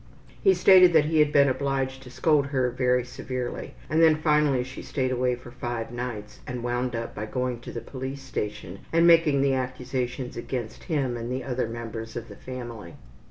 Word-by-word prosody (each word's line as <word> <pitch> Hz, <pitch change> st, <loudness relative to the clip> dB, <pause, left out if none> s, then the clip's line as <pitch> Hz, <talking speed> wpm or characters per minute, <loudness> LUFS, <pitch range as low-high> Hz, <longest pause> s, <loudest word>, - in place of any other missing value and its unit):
He 385 Hz, -1 st, +6 dB
stated 185 Hz, -2 st, +7 dB
that 155 Hz, -2 st, +5 dB
he 155 Hz, 0 st, +2 dB
had 150 Hz, -1 st, +4 dB
been 140 Hz, -1 st, +5 dB
obliged 135 Hz, 0 st, -1 dB
to 130 Hz, -, -11 dB
scold 145 Hz, +2 st, +2 dB
her 130 Hz, -3 st, 0 dB
very 125 Hz, 0 st, +1 dB
severely, 125 Hz, 0 st, -5 dB
and 155 Hz, +2 st, +2 dB
then 160 Hz, -1 st, +7 dB
finally 150 Hz, -4 st, +3 dB
she 130 Hz, +1 st, -8 dB
stayed 130 Hz, -3 st, -2 dB
away 125 Hz, 0 st, +1 dB
for 120 Hz, 0 st, -12 dB
five 120 Hz, -2 st, -4 dB
nights 120 Hz, -4 st, -6 dB
and 125 Hz, -1 st, -4 dB
wound 120 Hz, 0 st, -1 dB
up 115 Hz, 0 st, -4 dB
by 105 Hz, +1 st, -5 dB
going 125 Hz, +1 st, -2 dB
to 120 Hz, -, -9 dB
the 115 Hz, -, -5 dB
police 135 Hz, +3 st, -6 dB
station 105 Hz, -7 st, -5 dB
and 165 Hz, +1 st, +4 dB
making 165 Hz, -5 st, +5 dB
the 140 Hz, -1 st, +3 dB
accusations 125 Hz, 0 st, -3 dB
against 120 Hz, -2 st, -5 dB
him 140 Hz, -7 st, 0 dB
and 120 Hz, +1 st, -5 dB
the 130 Hz, 0 st, -2 dB
other 125 Hz, -2 st, -1 dB
members 115 Hz, -1 st, -6 dB
of 115 Hz, -1 st, -6 dB
the 100 Hz, -, -10 dB
family. 120 Hz, -7 st, -8 dB
125 Hz, 195 wpm, -26 LUFS, 120-140 Hz, -, stated